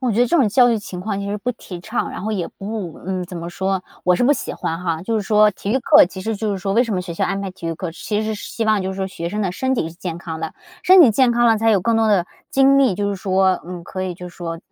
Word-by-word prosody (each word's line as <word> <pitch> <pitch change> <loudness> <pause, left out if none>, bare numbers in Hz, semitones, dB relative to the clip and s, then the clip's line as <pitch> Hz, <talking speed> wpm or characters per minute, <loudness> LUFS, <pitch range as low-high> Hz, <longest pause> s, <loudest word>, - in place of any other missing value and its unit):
我 255 -2 0
觉 225 - +1
得 245 - +5
这 345 - +2
种 265 -9 +4
教 245 +4 +5
育 225 - +1
情 185 -3 -7
况 200 +1 -3
其 200 - -4
实 205 +1 -2
不 245 +5 -2
提 185 -6 -9
倡， 220 +6 -3
然 - - -7
后 215 - -2
也 185 -5 -2
不 195 -5 -6
嗯， 185 -1 -2
怎 180 0 -8
么 170 0 -5
说， 190 +1 -2 0.2
我 180 - +4
是 - - 0
不 280 - +5
喜 - - -4
欢 165 +1 -3
哈。 165 -2 -2
就 225 +5 -2
是 215 - 0
说 210 +1 +4
体 195 - -5
育 260 - +2
课， 300 +4 +6
其 190 - -9
实 220 +3 -2
就 215 +1 -2
是 195 - -3
说 195 +1 -2
为 230 +4 +4
什 225 - -2
么 185 - 0
学 180 -1 -6
校 - - 0
安 195 - -2
排 195 - -4
体 185 -2 -9
育 165 - -2
课， 170 0 -5
其 210 +5 -3
实 215 0 -2
是 205 - -8
希 230 - -2
望 215 -2 +2
就 190 - -3
是 - - -8
说 190 -1 -2
学 170 -3 -5
生 210 +3 -3
的 185 -3 -1
身 260 +7 -1
体 165 - -1
是 165 - -12
健 170 -1 -5
康 160 -2 -6
的。 - - -5 0.3
身 370 0 +7
体 280 -9 +8
健 245 +2 +3
康 240 0 +3
了， 225 -1 +5
才 225 +1 +3
有 205 -3 +3
更 230 +4 +1
多 225 -1 +2
的 190 -5 +2 0.2
精 275 +1 +5
力， 260 -8 +3
就 205 +2 -1
是 200 - -2
说 190 -1 +1
嗯， 180 -1 -7
可 185 - -5
以 185 -1 -3
就 180 +1 -9
是 175 - -17
说 165 -1 -5
200 Hz, 355 characters per minute, -20 LUFS, 180-225 Hz, 0.3 s, 体